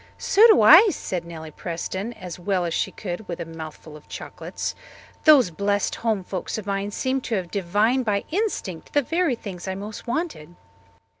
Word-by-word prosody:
"So 430 +4 +6
do 435 - +6
I," 335 - +9
said 180 - -4
Nellie 160 -2 -8
Preston 185 +7 -4
as 180 -5 -8
well 180 0 0
as 170 - -2
she - - 0
could 190 +1 -6
with 170 - -5
a - - -4
mouthful 160 -1 -9
of 150 - -14
chocolates. - - -5 0.5
"Those 280 - +7
blessed 200 +4 0
home 220 -4 -1
folks 185 +2 -4
of 215 - -6
mine 200 0 -2
seem 260 +5 -1
to 235 - -2
have 180 -3 -3
divined 205 +7 +1
by 205 -3 0
instinct 335 - -3
the 290 - +3
very 330 -1 +1
things 190 -5 -8
I 190 - -2
most 205 +5 -8
wanted." 235 - -3
200 Hz, 180 wpm, -24 LUFS, 175-245 Hz, 0.5 s, I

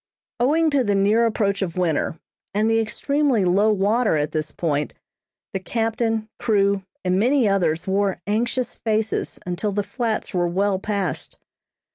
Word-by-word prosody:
Owing 310 +6 +3
to 280 -2 +3
the 205 -3 +1
near 210 +4 +3
approach 200 -3 0
of 185 -2 -3
winter, 165 -2 0 0.4
and 215 +1 +2
the 225 0 +3
extremely 260 0 +1
low 200 +5 +3
water 210 +2 +2
at 150 0 -1
this 155 -1 -2
point, 150 -3 -2 0.6
the 195 - -1
captain, 225 +1 -1
crew, 200 -4 +2 0.2
and 185 +1 +2
many 250 +2 +3
others, 175 -5 +1
wore 195 0 0
anxious 235 +4 -1
faces 220 -1 -1
until 180 +4 -2
the 205 +1 -1
Flats 230 -1 -3
were 175 -1 +1
well 190 +2 0
passed. 195 -7 -3
205 Hz, 150 wpm, -22 LUFS, 190-225 Hz, 0.6 s, Owing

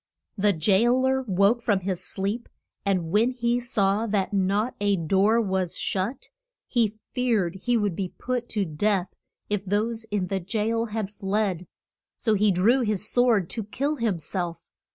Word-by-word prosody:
The 205 0 +3
jail 210 +9 +3
er 265 0 +2
woke 200 +5 +3
from 205 -5 +1
his 185 -1 -2
sleep, 205 +5 -3 0.3
and 185 -5 0
when 215 +5 +4
he 240 -1 0
saw 215 -2 +1
that 205 -2 0
not 200 +5 +1
a 205 -1 +3
door 195 +6 +2
was 190 -5 -1
shut, 200 +7 -2 0.4
he 225 -4 +1 0.2
feared 225 -9 +1
he 235 +5 0
would 205 -5 0
be 190 0 -3
put 250 -1 -3
to 205 -3 0
death 185 +3 0 0.3
if 205 -2 -1
those 220 +3 -1
in 205 -4 -1
the 190 +1 -2
jail 220 +4 -1
had 215 -3 -4
fled. 195 -3 -1 0.5
So 220 - +1
he 210 0 +3
drew 200 +8 +4
his 210 -3 0
sword 235 -7 +3
to 225 - -2
kill 280 +8 -2
him 225 -7 0
self. 170 +2 -4
205 Hz, 165 wpm, -25 LUFS, 190-230 Hz, 0.5 s, when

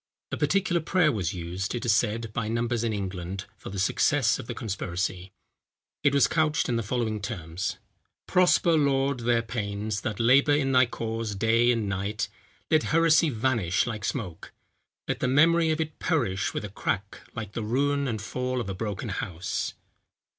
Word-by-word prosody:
A - - -2
particular 185 -3 +1
prayer 165 -1 +3
was 95 - -2
used, 90 +5 -4
it 120 - -4
is 115 -3 +4
said, 115 0 -1
by 110 -2 -2
numbers 115 +1 -1
in 115 - 0
England, 95 -2 -4
for - - -9
the 100 - -6
success 95 - +2
of - - -7
the - - -4
conspiracy; 95 -2 -3 0.7
it 145 - +5
was 140 - +6
couched 155 -2 +1
in 120 - 0
the 115 - +1
following 110 -1 -2
terms: 90 -4 -4 0.5
"Prosper, 180 -1 +4
Lord, 140 -3 +2
their 120 0 +2
pains, 105 -2 -3
that 105 -2 -3
labour 130 +5 +5
in 135 -2 +1
thy 130 -1 +5
cause 115 -2 -3
day 115 +4 +3
and 115 -3 0
night; 100 +2 -2 0.4
let 155 -1 +5
heresy 165 0 +4
vanish 115 -7 +1
like 110 -4 -4
smoke; 105 -8 -4 0.6
let - - -2
the - - 0
memory 165 +5 +4
of 155 0 0
it 155 -1 -3
perish 115 - 0
with - - -4
a - - -6
crack, 100 0 -3 0.2
like 110 -3 -5
the 115 - -4
ruin 140 +5 +1
and 110 -4 -3
fall 125 +2 -2
of 110 -5 -4
a - - -2
broken 105 +3 -4
house." 90 -2 -3
115 Hz, 175 wpm, -27 LUFS, 100-135 Hz, 0.7 s, was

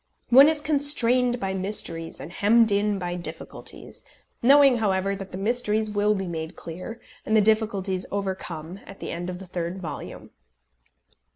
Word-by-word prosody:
One 270 +4 +8
is 315 -2 0
constrained 255 -5 +3
by 195 -2 -2
mysteries 185 -4 -2
and 165 +5 -9
hemmed 220 +3 +4
in 205 0 +1
by 175 -2 -4
difficulties, 165 -2 -6 0.4
knowing, 275 0 +6
however, 195 -2 0
that 195 -1 -9
the 185 - -6
mysteries 215 0 0
will 210 0 +1
be 195 -1 -3
made 160 0 -5
clear, 185 +8 -8 0.2
and 215 - 0
the - - +6
difficulties 205 -3 +1
overcome 190 -3 -5
at 195 - -12
the - - -5
end 175 +1 -4
of 180 - -5
the 190 - -10
third 175 +1 -4
volume. 155 -5 -8
200 Hz, 160 wpm, -25 LUFS, 180-225 Hz, 0.4 s, One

